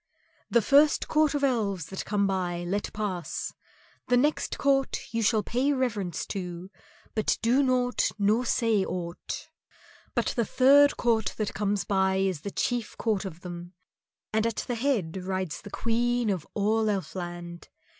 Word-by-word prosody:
"The 235 -2 +3
first 290 +6 +4
court 305 -1 +2
of 285 - -1
Elves 205 - 0
that 190 - -5
come 205 -1 +1
by 180 -3 -1
let 195 +4 -2
pass. 195 -5 -3 0.5
The 250 - +4
next 295 +5 +1
court 275 -1 +2 0.2
you 230 - 0
shall 220 0 +2
pay 260 +7 +1
reverence 220 - -1
to, 180 -1 -6 0.4
but 215 - +1
do 245 +5 +4
naught 250 -2 +2
nor 210 +4 +2
say 225 -4 +2
aught. 180 - -5 0.7
But - - +1
the 235 - +2
third 280 +5 +5
court 230 -2 +1
that 215 -2 -2
comes 205 -2 0
by 190 -1 +1
is 190 -5 0
the 200 - -4
chief 240 +2 -2
court 215 -4 0
of 175 -2 -7
them, 175 0 -8 0.6
and 220 +1 +2
at 230 - -3
the 245 - -2
head 225 - 0
rides 185 -2 -3
the 205 - -10
Queen 235 +1 0
of 180 -5 -3
all 220 +2 +2
Elfland. 175 -3 -5
210 Hz, 155 wpm, -27 LUFS, 190-245 Hz, 0.7 s, third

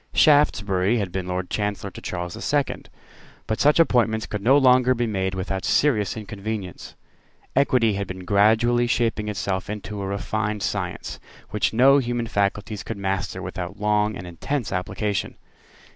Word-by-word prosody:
Shaftesbury 105 - +3
had 100 -5 -2
been 95 0 -3
Lord 90 0 -3
Chancellor 105 -1 -2
to - - -10
Charles 90 -1 -4
the - - -8
Second. 145 -2 -1 0.6
But 110 - -2
such 150 +3 +4
appointments 115 -8 +3
could 105 - -5
no 130 +7 +5
longer 130 -1 +5
be 120 0 0
made 95 -3 -2
without 95 +1 -3
serious 110 -9 +2
inconvenience. 105 -3 -6 0.6
Equity 125 -5 +3
had 100 0 -3
been 95 -1 -7
gradually 110 +5 +3
shaping 115 -3 0
itself 100 -2 -3
into 105 -1 -5
a 95 - -3
refined 105 +1 -2
science, 90 - -3 0.3
which - - +1
no 135 +5 +5
human 120 -2 -2
faculties 105 0 -1
could 115 - -6
master 95 -1 -3
without 95 +3 -6
long 105 0 +1
and 90 - -7
intense 110 - -3
application. 95 +2 -2
105 Hz, 155 wpm, -23 LUFS, 95-120 Hz, 0.6 s, no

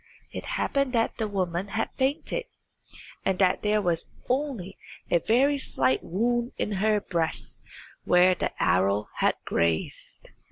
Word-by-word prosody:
It - - -6
happened 275 -2 0
that 230 -1 +1
the 220 -2 -1
woman 185 -2 -2
had 220 +2 -2
fainted, 290 - -1 0.8
and 190 -1 +1
that 185 -1 +3
there 210 0 +1
was 170 -2 0 0.2
only 250 -8 -2 0.4
a 170 - +5
very 270 - +3
slight 130 - +1
wound 240 +6 0
in - - -2
her 215 0 +3
breast 170 -5 -2 0.4
where 180 +1 +5
the - - -1
arrow 100 +3 +2
had - - +2
grazed. 85 -1 -2
205 Hz, 135 wpm, -27 LUFS, 175-240 Hz, 0.8 s, a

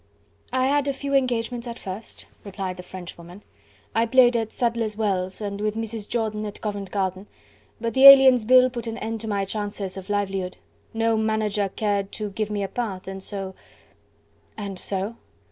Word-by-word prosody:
"I 260 0 +2
had 285 +1 +2
a 280 - +1
few 280 +1 -4
engagements 245 -2 0
at 235 0 -6
first," 195 +4 -8 0.2
replied 190 -2 -5
the - - -6
Frenchwoman. 180 +1 -10 0.5
"I 225 +1 +2
played 245 0 +5
at 225 -1 -1
Sadler's 230 -3 -1
Wells 190 -4 -1
and 200 -1 -4
with 215 0 -1
Mrs. 225 -2 -4
Jordan 215 -2 -1
at 205 - -8
Covent 205 -2 -4
Garden, 190 0 -2 0.5
but 230 -1 -2
the 270 +1 +9
Aliens' 265 -3 +9
Bill 255 +2 +6
put 240 -2 -5
an 225 0 -4
end 225 -1 -4
to 225 - -6
my 200 -2 0
chances 205 -2 -4
of 190 0 -9
livelihood. 195 -3 -2 0.3
No 225 0 +1
manager 215 -2 0
cared 200 -1 -1
to 210 -2 -4
give 215 +1 -2
me 205 -1 -2
a - - -1
part, 195 -5 -4
and 190 0 -6
so..." 195 -1 -5 1.0
"And 200 -3 -5
so?" 200 +4 -3
215 Hz, 180 wpm, -24 LUFS, 195-230 Hz, 1.0 s, the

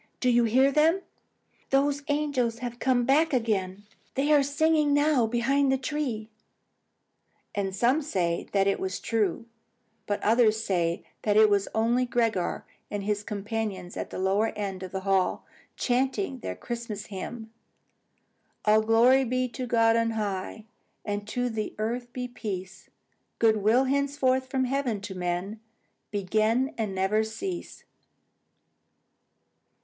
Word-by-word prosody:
Do 250 - +2
you 240 0 +4
hear 260 +5 +4
them? 320 +6 +3 0.7
Those 280 +1 +2
angels 285 -6 0
have 240 0 -6
come 250 -2 +2
back 300 +4 +3
again. 205 -5 -1 0.3
They 285 +3 +2
are 290 - +6
singing 295 +1 +2
now 290 -5 +3
behind 265 +4 +2
the 265 - +2
tree." 255 -6 -3 1.2
And 195 -2 -2
some 250 +9 +2
say 175 - -1
that 195 -1 +2
it 195 - +1
was 190 -1 -3
true; 220 -1 -1 0.6
but 205 - -1
others 220 -1 +4
say 170 -5 0 0.2
that 210 -1 +2
it 215 -1 +6
was 200 -1 +2
only 240 +3 +2
Gregor 230 -7 0 0.2
and 205 -1 -4
his 205 0 -1
companions 210 -3 -4
at - - -4
the - - -7
lower 195 +4 +2
end 195 -3 -4
of 185 -1 -7
the 190 - -3
hall, 190 -1 +1 0.3
chanting 265 +4 0
their - - -5
Christmas 230 -4 -6
hymn: 220 +3 -7 1.1
All 215 0 +5
glory 235 +4 +5
be 255 +1 0
to 250 +1 -5
God 230 -1 +4
on 230 0 +1
high, 205 +1 -3 0.4
And 205 0 -3
to 245 +3 -1
the 220 -3 -4
earth 240 +3 -3
be 250 0 -4
peace! 190 -6 -7 0.5
Good 220 -1 +4
will, 220 +5 +3
henceforth, 270 -1 +1
from 265 -1 0
heaven 255 -4 -1
to 200 -1 -6
men 180 +4 -3 0.5
Begin, 215 +7 +1
and 210 -4 -3
never 195 +3 +2
cease. 345 - -6
230 Hz, 140 wpm, -27 LUFS, 205-260 Hz, 1.2 s, are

